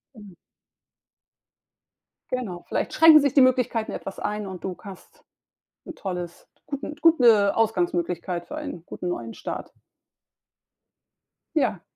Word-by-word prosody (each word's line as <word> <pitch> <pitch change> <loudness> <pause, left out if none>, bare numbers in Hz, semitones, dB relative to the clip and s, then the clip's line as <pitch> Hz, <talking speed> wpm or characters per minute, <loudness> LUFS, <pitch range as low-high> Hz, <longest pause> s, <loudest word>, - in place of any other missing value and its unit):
Mhm. 205 -4 -13 2.0
Genau, 230 -9 -4
vielleicht - - -2
schränken 320 -1 +8
sich 280 -2 +1
die 280 - +6
Möglichkeiten 250 -3 +2
etwas 195 - -7
ein 210 0 -3
und 185 -2 -8
du 185 -1 -4
ka 200 - -10
hast 190 - -17 0.6
'n 340 - -8
tolles 180 - -6 0.2
guten 285 +1 -5
gute 240 -12 +5
Ausgangsmöglichkeit 175 -4 -1
für 300 - -6
einen 285 - -7
guten 180 - -6
neuen 115 -9 -4
Start. - - -6 1.8
Ja, - - +1
210 Hz, 120 wpm, -24 LUFS, 180-255 Hz, 2.0 s, schränken